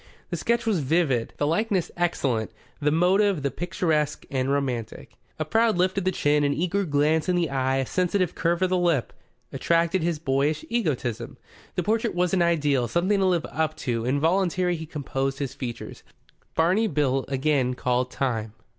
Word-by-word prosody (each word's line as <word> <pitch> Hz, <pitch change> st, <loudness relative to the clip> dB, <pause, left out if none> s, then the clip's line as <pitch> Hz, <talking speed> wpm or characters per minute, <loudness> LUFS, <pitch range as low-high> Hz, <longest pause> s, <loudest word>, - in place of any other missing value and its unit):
The -, -, 0 dB
sketch 235 Hz, 0 st, 0 dB
was 215 Hz, -6 st, +1 dB
vivid, 135 Hz, -5 st, +1 dB
the 145 Hz, -, 0 dB
likeness 185 Hz, +3 st, 0 dB
excellent; 135 Hz, -10 st, 0 dB, 0.3 s
the 150 Hz, -1 st, +2 dB
motive, 180 Hz, +1 st, +2 dB
the 140 Hz, -, 0 dB
picturesque 160 Hz, -2 st, -1 dB
and 130 Hz, -1 st, 0 dB
romantic. 130 Hz, -5 st, -3 dB, 0.3 s
A 155 Hz, -, -2 dB
proud 225 Hz, +4 st, +2 dB
lift 185 Hz, +1 st, +2 dB
of 190 Hz, -, -5 dB
the 185 Hz, -, +2 dB
chin, 145 Hz, -3 st, +2 dB
an 145 Hz, 0 st, +1 dB
eager 185 Hz, +4 st, 0 dB
glance 155 Hz, +2 st, +1 dB
in 180 Hz, -, +2 dB
the 170 Hz, -4 st, 0 dB
eye, 130 Hz, -1 st, 0 dB
a 135 Hz, 0 st, 0 dB
sensitive 185 Hz, +2 st, 0 dB
curve 170 Hz, +2 st, 0 dB
of 185 Hz, -, +1 dB
the 185 Hz, -, +2 dB
lip 170 Hz, -8 st, +1 dB, 0.4 s
attracted 170 Hz, +2 st, +1 dB
his 170 Hz, -1 st, 0 dB
boyish 145 Hz, +1 st, 0 dB
egotism. 130 Hz, -, -2 dB, 0.4 s
The 180 Hz, -, 0 dB
portrait 225 Hz, +2 st, 0 dB
was 180 Hz, +1 st, +1 dB
an 185 Hz, -, +3 dB
ideal, 145 Hz, -7 st, +2 dB
something 185 Hz, -, +1 dB
to 190 Hz, -, +2 dB
live 175 Hz, -3 st, +1 dB
up 155 Hz, -1 st, -2 dB
to. 115 Hz, -2 st, -1 dB
Involuntarily 175 Hz, +7 st, +1 dB
he 160 Hz, -1 st, -7 dB
composed 135 Hz, -3 st, -3 dB
his 140 Hz, -2 st, -4 dB
features. 120 Hz, -2 st, -7 dB, 0.5 s
Barney 185 Hz, +7 st, +3 dB
Bill 135 Hz, -5 st, +1 dB
again 135 Hz, -2 st, +1 dB
called 125 Hz, 0 st, 0 dB
time. 115 Hz, -6 st, -2 dB
155 Hz, 175 wpm, -25 LUFS, 135-180 Hz, 0.5 s, an